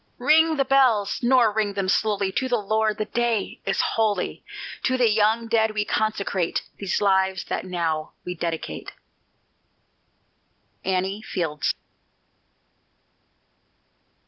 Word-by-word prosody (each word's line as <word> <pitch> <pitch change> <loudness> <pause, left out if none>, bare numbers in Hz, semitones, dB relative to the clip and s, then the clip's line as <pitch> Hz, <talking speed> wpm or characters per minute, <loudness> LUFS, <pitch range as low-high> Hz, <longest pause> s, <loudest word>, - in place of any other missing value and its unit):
Ring 315 +5 +4
the 275 - +2
bells, 255 -7 +3
nor 240 -3 +4
ring 210 -2 0
them 195 -1 -1
slowly, 200 0 +1
To 260 +6 -1
the 245 - +2
Lord 215 0 0
the 215 - -1
day 235 -3 -1
is - - +1
holy; 210 -4 -1 0.4
To 260 0 +1
the 245 -2 +4
young 220 +2 +2
dead 220 -1 +2
we 210 -1 0
consecrate 200 -5 -1 0.2
These 195 -3 -1
lives 190 -2 +2
that - - -2
now 165 -4 -2
we 180 - -3
dedicate. 165 -1 -5 1.9
ANNIE 190 +2 -1
FIELDS. 165 -8 -2
210 Hz, 120 wpm, -24 LUFS, 190-230 Hz, 1.9 s, Ring